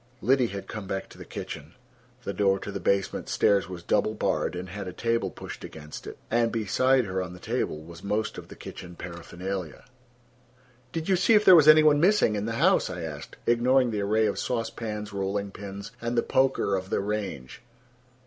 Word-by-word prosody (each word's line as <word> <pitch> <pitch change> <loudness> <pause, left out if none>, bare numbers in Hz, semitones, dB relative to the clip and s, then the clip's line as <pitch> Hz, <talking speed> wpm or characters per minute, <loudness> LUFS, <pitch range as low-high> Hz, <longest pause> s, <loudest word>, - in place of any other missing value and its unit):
Liddy 130 -1 +3
had 100 -2 -7
come 105 -3 -6
back 95 0 -3
to - - -14
the - - -9
kitchen: 75 +4 -7 0.5
the 100 - -3
door 100 -1 +3
to 100 - -6
the - - -4
basement 100 -1 0
stairs 100 -2 +2
was 90 -2 -7
double 105 +3 +1
barred, 105 - 0
and 90 +1 -5
had 100 +1 -6
a 90 - -6
table 115 -1 0
pushed - - -9
against 75 -1 -9
it; - - -8
and 115 0 +2
beside 125 +4 +2
her 95 -1 -2
on 90 -1 -6
the 90 - -11
table 75 -2 -2
was 85 +1 -11
most 105 +2 -1
of - - -11
the - - -11
kitchen 90 0 -9
paraphernalia. 85 0 -6 1.1
"Did 165 +2 -4
you 190 - +4
see 190 +5 +4
if 210 - +4
there 185 - +10
was 155 -3 +6
any 155 0 +9
one 150 -1 +5
missing 185 - +4
in 105 +1 -2
the 115 - -2
house?" 170 - +3
I 90 -2 -5
asked, 75 -3 -7
ignoring 125 +1 +3
the 105 -2 -1
array 110 +2 +2
of 105 - -1
sauce 115 -2 -1
pans 105 -2 -5
rolling 100 +1 -2
pins, 100 +2 -8
and 120 +1 -2
the 115 - +3
poker 130 -6 +2
of 95 0 -4
the - - +1
range. 100 -11 -4
105 Hz, 205 wpm, -27 LUFS, 95-120 Hz, 1.1 s, there